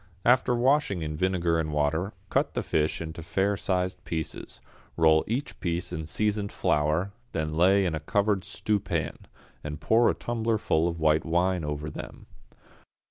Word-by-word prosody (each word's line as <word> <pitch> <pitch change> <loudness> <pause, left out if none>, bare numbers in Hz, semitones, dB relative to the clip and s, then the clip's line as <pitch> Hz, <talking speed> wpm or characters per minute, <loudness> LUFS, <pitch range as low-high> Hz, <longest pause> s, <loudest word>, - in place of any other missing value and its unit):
After 125 0 +4
washing 125 - +2
in 75 0 -3
vinegar 85 -1 +1
and 80 -1 -2
water, 80 +7 0 0.2
cut - - +1
the - - -1
fish 75 +1 0
into 80 0 -6
fair 95 +5 0
sized 90 -2 -1
pieces, 80 -2 -5 0.4
roll 80 -1 +5
each 125 +6 -3
piece 85 0 -2
in 80 -2 -4
seasoned 105 +2 0
flour, 75 +6 +1 0.2
then 80 -1 -2
lay 95 +4 +4
in 85 - 0
a 80 - -2
covered 100 +4 +1
stewpan, 95 -10 -1 0.4
and 75 0 -5
pour 115 +1 +4
a - - 0
tumblerful 110 -8 0
of 85 -1 -3
white 80 0 +3
wine 90 +1 +1
over 75 0 -3
them. 75 - -8
85 Hz, 155 wpm, -27 LUFS, 80-100 Hz, 0.4 s, roll